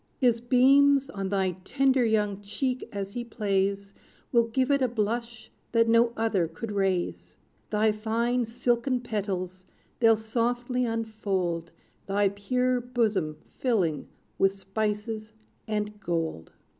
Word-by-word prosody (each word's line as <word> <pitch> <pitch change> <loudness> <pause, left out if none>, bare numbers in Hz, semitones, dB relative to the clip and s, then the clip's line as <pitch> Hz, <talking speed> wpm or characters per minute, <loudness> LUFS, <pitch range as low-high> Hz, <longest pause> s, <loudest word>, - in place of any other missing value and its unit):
His 240 -3 +2
beams, 275 +3 +5
on 195 -1 -3
thy 190 -2 +1
tender 265 +2 +2
young 210 -3 +1
cheek 250 +6 -3
as 200 -1 -5
he 240 - -3
plays, 200 -3 -1 0.4
Will 235 -2 +4
give 260 +4 +1
it 280 -1 +3
a 255 - +3
blush 235 +1 -3 0.2
that 230 -1 +4
no 230 +1 +4
other 220 -6 +1
could 190 +7 -7
raise: 195 -3 -1 0.3
Thy 215 0 +3
fine 230 +3 0
silken 240 +2 0
petals 190 -5 -4 0.3
they'll 225 -2 +5
softly 240 +3 -1
unfold, 200 -7 -2 0.4
Thy 200 0 +2
pure 250 +5 0
bosom 220 -11 0 0.2
filling 180 - 0 0.3
with 195 0 +3
spices 215 +2 -3 0.3
and 210 -1 -2
gold! 165 - -3
220 Hz, 125 wpm, -27 LUFS, 200-240 Hz, 0.4 s, beams